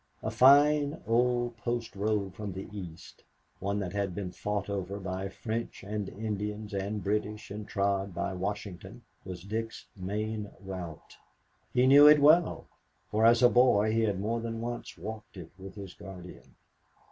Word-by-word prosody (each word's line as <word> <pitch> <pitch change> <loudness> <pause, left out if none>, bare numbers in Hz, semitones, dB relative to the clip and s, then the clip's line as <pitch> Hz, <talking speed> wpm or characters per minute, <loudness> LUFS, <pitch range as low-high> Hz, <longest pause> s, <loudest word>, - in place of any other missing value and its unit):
A 110 - -1
fine, 145 +5 +5
old 120 +1 +1
post 120 -1 -3
road 100 -1 -1
from 105 -3 -5
the 95 +1 -6
East, 85 -5 -9 0.4
one 100 +1 -1
that 95 -1 -4
had 100 -3 -2
been 95 -2 -4
fought 105 +1 -3
over 100 0 -3
by 95 0 -4
French 115 +3 -5
and 105 0 -3
Indians 105 0 -4
and 100 +1 -2
British 105 +1 -2
and 105 +1 -6
trod 100 -1 0
by 90 - -3
Washington, 100 +3 -5 0.2
was 90 -2 -7
Dick's 110 +3 -4
main 105 +2 -3
route. 90 -5 -8 0.5
He 125 - +3
knew 140 +2 +9
it 150 0 +8
well, 155 +4 +4 0.5
for 110 +2 +4
as 115 +1 +5
a 120 - +8
boy 115 -4 +4
he 115 - +2
had 105 -4 0
more 115 +4 -1
than 115 0 -4
once 120 +1 -5
walked 110 -1 -8
it 85 -3 -9
with 95 +1 -9
his 100 -3 -8
guardian. 90 -9 -11
105 Hz, 160 wpm, -30 LUFS, 95-115 Hz, 0.5 s, knew